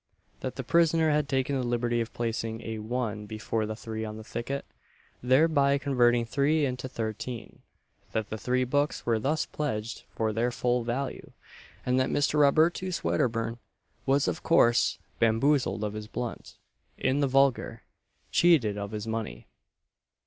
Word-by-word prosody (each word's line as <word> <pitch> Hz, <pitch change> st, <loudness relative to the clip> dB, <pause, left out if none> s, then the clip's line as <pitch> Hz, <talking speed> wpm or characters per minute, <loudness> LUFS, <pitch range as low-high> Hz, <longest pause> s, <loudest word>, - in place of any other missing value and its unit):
that 130 Hz, -, -4 dB
the 135 Hz, -, -4 dB
prisoner 165 Hz, +2 st, +3 dB
had 150 Hz, -1 st, +1 dB
taken 135 Hz, +1 st, 0 dB
the 130 Hz, -, 0 dB
liberty 120 Hz, -1 st, 0 dB
of 115 Hz, 0 st, -4 dB
placing 115 Hz, -1 st, -3 dB
a 110 Hz, -1 st, -4 dB
1 110 Hz, -2 st, -3 dB
before 110 Hz, 0 st, -2 dB
the 110 Hz, -, -4 dB
3 110 Hz, -1 st, -5 dB
on 110 Hz, 0 st, -5 dB
the 110 Hz, -, -8 dB
ticket, 120 Hz, +5 st, -4 dB, 0.6 s
thereby 140 Hz, +2 st, +4 dB
converting 120 Hz, -4 st, +3 dB
3 145 Hz, +5 st, +2 dB
into 130 Hz, 0 st, -3 dB
13; 115 Hz, +1 st, -5 dB, 0.5 s
that 110 Hz, -1 st, -2 dB
the 110 Hz, -, -2 dB
three 125 Hz, +2 st, +1 dB
books 145 Hz, +4 st, 0 dB
were 115 Hz, -2 st, +2 dB
thus 150 Hz, +7 st, 0 dB
pledged 115 Hz, -7 st, -3 dB
for 110 Hz, -1 st, -1 dB
their 115 Hz, +3 st, +1 dB
full 125 Hz, 0 st, 0 dB
value; 125 Hz, +4 st, -4 dB, 0.5 s
and 125 Hz, +1 st, +2 dB
that 130 Hz, -, +1 dB
Mr. 145 Hz, +1 st, +1 dB
Robertus 165 Hz, +5 st, +3 dB
Wedderburn 115 Hz, +7 st, 0 dB, 0.5 s
was 135 Hz, -2 st, +3 dB
of 90 Hz, -, -2 dB
course 120 Hz, 0 st, +4 dB, 0.2 s
bamboozled 115 Hz, -1 st, +2 dB
of 105 Hz, -1 st, -2 dB
his 105 Hz, 0 st, -6 dB
blunt 120 Hz, +1 st, -6 dB, 0.4 s
in 135 Hz, +2 st, +1 dB
the 140 Hz, -, +2 dB
vulgar, 135 Hz, -1 st, +2 dB, 0.5 s
"cheated 125 Hz, -13 st, +4 dB
of 100 Hz, 0 st, -4 dB
his 105 Hz, 0 st, -4 dB
money." 110 Hz, -, -4 dB
120 Hz, 155 wpm, -28 LUFS, 110-140 Hz, 0.6 s, thereby